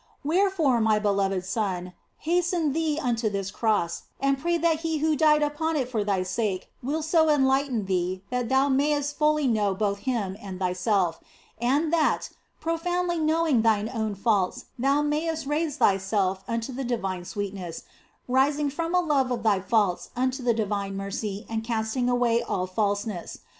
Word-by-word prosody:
Wherefore, 325 -6 +2
my 220 -1 +3
beloved 195 -3 0
son, 185 -3 -2 0.2
haste 350 +2 0 0.2
thee 315 -1 0
unto 235 -5 0
this 200 -1 -3
Cross 210 -7 0
and 275 0 +1
pray 340 +3 +1
that 330 -1 +2
He 325 -1 -1
who 310 +1 +1
died 300 0 +4
upon 315 +2 -1
it 265 -5 0
for 225 -5 -1
thy 195 -2 0
sake 190 0 -2
will 300 +5 -2
so 315 0 +3
enlighten 265 -5 +2
thee 185 0 -1
that 250 -2 -1
thou 265 +1 +3
mayst 290 +1 +1
fully 305 -1 +2
know 210 -5 +1
both 200 0 -1
Him 215 -6 -2
and 190 -2 -7
thyself, 185 -1 0 0.4
and 290 +7 +1
that, 320 -2 +1 0.3
profoundly 345 +1 -1
knowing 315 -5 +2
thine 220 -1 +2
own 220 -3 -2
faults, 200 -3 0
thou 275 +3 +2
mayest 310 +1 -1
raise 300 +1 -1
thyself 195 -3 +1
unto 230 +2 -3
the 270 +2 -4
divine 195 -7 -2
sweetness, 190 -3 -5 0.4
rising 280 +3 +2
from 330 +4 -2
a 360 - +5
love 285 -6 +1
of 240 -2 -2
thy 210 -4 +3
faults 200 -3 +1
unto 255 +2 0
the 240 -2 +2
divine 200 -3 -2
mercy 200 +1 -4
and 225 0 -3
cast 220 0 -2
ing 250 -1 +1
away 240 -1 +2
all 185 - -2
falseness. 205 0 -2
240 Hz, 165 wpm, -26 LUFS, 200-295 Hz, 0.4 s, a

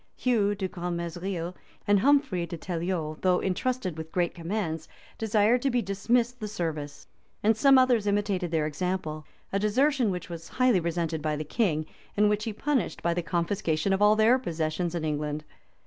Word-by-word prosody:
Hugh 210 -5 +1
de 195 -1 -2
Grentmesnil 175 0 -4 0.3
and 205 -1 +5
Humphry 265 -8 +2
de 170 - -6
Teliol, 165 -2 -3
though 180 -1 +3
intrusted 190 -3 -2
with 160 0 -7
great 175 -2 0
commands, 165 -3 -3 0.3
desired 220 +2 +3
to 275 - +1
be 245 -2 +1
dismissed 235 +5 0
the 215 - -4
service; 160 -7 -4 0.4
and 220 +2 +4
some 275 +4 +6
others 245 -5 +3
imitated 200 -3 0
their 160 -2 +1
example; 155 -1 -3 0.3
a 195 - +2
desertion 250 +4 +2
which 180 -3 -4
was 165 -2 -8
highly 255 -6 +3
resented 165 -2 -2
by 155 0 -1
the 150 - -3
king, 155 -2 0 0.3
and 210 0 +5
which 210 0 0
he 225 - -2
punished 265 +1 -1
by 170 - +2
the 175 - -1
confiscation 170 0 0
of 195 - 0
all 210 +1 +6
their 225 +4 +5
possessions 165 -3 -2
ii 170 - -2
England. 150 0 -2
185 Hz, 175 wpm, -27 LUFS, 165-215 Hz, 0.4 s, some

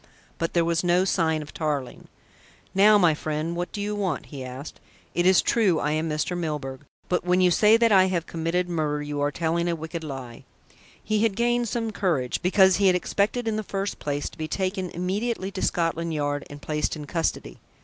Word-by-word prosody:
But 165 - -1
there 170 -1 +3
was 170 +1 +1
no 180 +1 +3
sign 160 -5 +1
of 145 - -13
Tarling. 145 -5 -3 0.7
"Now, 210 +2 +6
my 175 -5 +4
friend, 155 +2 -3
what 175 +1 -3
do - - -6
you 205 +1 -2
want?" 195 -7 -2
he 140 -3 -8
asked. 130 +3 -8 0.3
"It 175 +1 +2
is 190 -1 +5
true 195 -9 +2
I 150 - 0
am 155 +1 -1
Mr. 155 +4 -1
Milburgh, 150 -5 -4 0.2
but 180 - 0
when 180 +1 +2
you 180 -1 +4
say 215 +5 +5
that 230 -1 +3
I 190 -2 +6
have 180 -3 -1
committed 170 +2 -1
murder 150 -4 -1
you 145 -1 -3
are 145 - +2
telling 170 +2 -1
a 170 - 0
wicked 160 +1 -6
lie." 130 -5 -7 0.6
He 215 0 0
had 220 -3 +2
gained 240 +1 +1
some 230 -1 -2
courage, 165 -12 -1
because 190 +1 +5
he 200 -1 +3
had 185 - +5
expected 210 +6 0
in 215 -1 0
the - - -1
first 200 -1 -4
place 145 0 -2
to - - -17
be 155 - -2
taken 190 +1 -2
immediately 195 +4 -2
to 190 - -5
Scotland 165 -1 0
Yard 145 -1 -2
and 145 0 -11
placed 150 0 -1
in 150 -1 -7
custody. 160 - -2
170 Hz, 210 wpm, -25 LUFS, 155-195 Hz, 0.7 s, Now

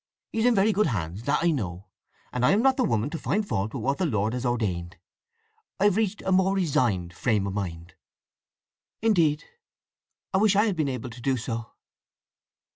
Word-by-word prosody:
He's 225 +1 0
in 245 - +4
very 200 +2 +4
good 210 -1 +2
hands, 90 - -3
that 145 - +1
I 170 - +4
know; 95 - -4 0.5
and 125 - -1
I 125 - +5
am 215 +4 +2
not 265 0 +4
the 260 - +1
woman 120 - 0
to 165 - -4
find 210 +1 -1
fault 105 - -2
with - - -4
what 140 +4 0
the 185 - +1
Lord 110 -3 0
has 125 0 -2
ordained. 90 -8 -2 0.8
I've 200 -1 +4
reached 215 -2 -1
a 190 - -1
more 190 +1 +3
resigned 120 - 0
frame 105 +1 0
of 100 - -3
mind." 85 -4 -5 1.1
"Indeed! 165 -9 +3 0.9
I 190 - +3
wish 210 -1 +4
I 205 +2 +4
had 205 -4 0
been 155 -4 0
able 125 -1 -5
to 120 +1 -11
do 130 +1 +1
so." 115 -1 -5
135 Hz, 195 wpm, -26 LUFS, -, 1.1 s, I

